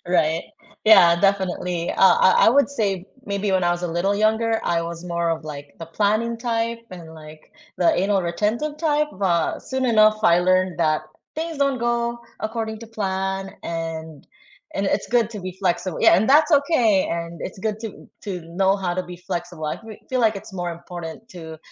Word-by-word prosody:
Right. 160 -2 +1 0.4
Yeah, 185 -6 +7
definitely. 180 -3 0
Uh, - - -3 0.3
I 185 - +5
I - - +8
would 280 +4 +4
say 200 -7 -2 0.2
maybe 200 0 -2
when 185 -2 +2
I 175 - +3
was 175 0 -4
a 175 - -1
little 175 +4 0
younger, 220 +2 +1
I 170 -1 0
was 170 +1 -6
more 170 -1 -1
of, 165 -1 -2
like, 145 -2 -9
the 165 - -6
planning 215 +6 0
type 230 -1 -2
and, 165 -3 -10
like, 155 -1 -14 0.2
the 175 - +3
anal-retentive 210 - 0
type, 300 -2 +1
but 175 -4 +1
soon 260 0 -1
enough, 215 -2 +4
I 175 -5 +5
learned 185 0 +2
that 155 -2 +2 0.3
things 320 -1 -4
don't 275 -2 +1
go 235 0 -1 0.2
according 220 0 -3
to 230 - -9
plan 195 -3 -3
and 160 -2 -5 0.5
and 195 - 0
it's - - -4
good 230 -2 +3
to 215 - -7
be 185 - -4
flexible 180 -1 -1
yeah, - - +6
and 215 +6 +1
that's 300 +3 +5
okay, 240 - +2
and 170 0 -6
it's - - -11
good 215 -1 -2
to 220 - -9 0.2
to 200 - -2 0.3
know 190 0 +5
how 180 -3 -2
to 185 - -1
be - - -8
flexible. 175 -2 -4
I - - -4
fe 220 -2 -10
feel, 255 -1 0
like, 215 - 0
it's 210 - -14
more 175 -1 -2
important 170 -2 -7 0.2
to 160 -2 -9
195 Hz, 190 wpm, -22 LUFS, 170-225 Hz, 0.5 s, I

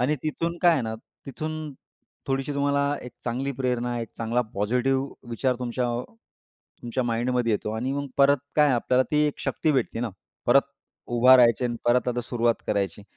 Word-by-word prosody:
आणि 135 +5 +2
तिथून 165 +2 -2
काय 175 - +7
आहे 140 -6 +1
ना, 110 0 -3 0.3
तिथून 155 +2 -5 0.5
थोडीशी 135 +1 -1
तुम्हाला 140 0 +1
एक 125 - -9
चांगली 130 +3 -2
प्रेरणा, 125 -2 -1
एक 115 - -5
चांगला 115 +2 0
पॉझिटिव्ह 125 +5 -1
विचार 125 +2 0
तुमच्या, 125 0 -2 1.0
तुमच्या 120 +2 -2
माइंडमध्ये 120 0 0
येतो 105 0 -1
आणि 130 +4 -2
मग 140 0 -2
परत 140 +1 +6 0.2
काय, 150 -2 +5
आपल्याला 125 +1 +2
ती 150 0 +3
एक 150 - -3
शक्ती 155 - 0
भेटते 125 -4 -1
ना, 120 -3 -2 0.4
परत - - +6 0.4
उभा 125 +2 +6
राहायची 120 -2 +4
आणि 120 -1 -1
परत 125 +1 +3
आता 120 0 -1
सुरुवात 120 -1 +1
करायची. 100 0 -1
125 Hz, 170 wpm, -25 LUFS, 120-140 Hz, 1.0 s, काय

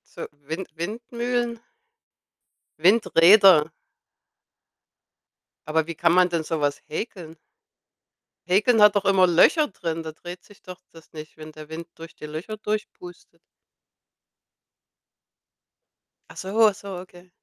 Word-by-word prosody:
So - - -7 0.2
Wind 165 +4 -5
Windmühlen 235 +5 -4 1.2
Windräder. 185 -2 +5 2.0
Aber 155 +1 -1
wie 170 - -6
kann 170 +2 +2
man 180 0 +4
denn 170 -2 -2
so 160 0 -4
was 145 0 -1
häkeln? 165 -2 -7 1.1
Häkeln 210 +5 +2
hat 210 0 +6
doch 200 - -3
immer 195 -2 +4
Löcher 295 - +3
drin? 165 -4 -5
Da 160 - -7
dreht 175 +3 -11
sich 205 - -20
doch 185 0 -12
das 165 -1 -18
nicht, 155 0 -11
wenn 155 0 -11
der 155 0 -12
Wind 165 +1 -8
durch 165 0 -12
die - - -10
Löcher 160 +8 -7
durchpustet. 210 -4 -7 2.9
Ach - - -15
so, 215 +4 +2
ach 205 - -1
so, 195 -2 -9
okay. 180 0 -15
180 Hz, 125 wpm, -23 LUFS, 160-210 Hz, 2.9 s, hat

